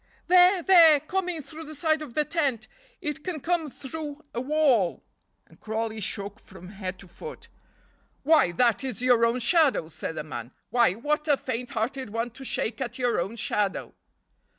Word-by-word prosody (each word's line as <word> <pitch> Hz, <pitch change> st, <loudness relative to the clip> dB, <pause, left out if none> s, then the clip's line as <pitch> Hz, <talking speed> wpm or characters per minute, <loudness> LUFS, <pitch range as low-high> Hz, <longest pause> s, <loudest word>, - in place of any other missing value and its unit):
"There! 360 Hz, 0 st, +5 dB
there! 330 Hz, -5 st, +7 dB
coming 360 Hz, -1 st, -3 dB
through 315 Hz, +4 st, -10 dB
the 310 Hz, +1 st, -8 dB
side 315 Hz, +1 st, +1 dB
of 280 Hz, -6 st, -8 dB
the 300 Hz, -, +2 dB
tent. 275 Hz, -10 st, -1 dB, 0.3 s
It 300 Hz, -2 st, -4 dB
can 350 Hz, -4 st, -3 dB
come 330 Hz, 0 st, -1 dB
through 300 Hz, +2 st, -7 dB
a 235 Hz, -, -2 dB
wall!" 260 Hz, -, +2 dB, 0.4 s
and -, -, -22 dB
Crawley 220 Hz, 0 st, -3 dB
shook 200 Hz, +1 st, -4 dB
from 185 Hz, -1 st, -13 dB
head 190 Hz, -2 st, -6 dB
to 195 Hz, -, -14 dB
foot. 470 Hz, -, -10 dB, 0.7 s
"Why, 300 Hz, -, +4 dB
that 235 Hz, +6 st, +2 dB
is 250 Hz, -2 st, -4 dB
your 245 Hz, -2 st, +4 dB
own 235 Hz, +2 st, 0 dB
shadow," 265 Hz, -, +3 dB
said 160 Hz, 0 st, -6 dB
the -, -, -4 dB
man. 120 Hz, -4 st, -7 dB, 0.2 s
"Why, 235 Hz, -6 st, +4 dB
what 300 Hz, +8 st, -2 dB
a 290 Hz, -2 st, +4 dB
faint 250 Hz, -1 st, -4 dB
hearted 255 Hz, +3 st, -2 dB
one 230 Hz, +3 st, -3 dB
to 270 Hz, -, -11 dB
shake 230 Hz, -2 st, -2 dB
at 245 Hz, 0 st, -4 dB
your 245 Hz, -5 st, +1 dB
own 195 Hz, +6 st, -3 dB
shadow." 205 Hz, -2 st, -1 dB
255 Hz, 175 wpm, -26 LUFS, 220-310 Hz, 0.7 s, there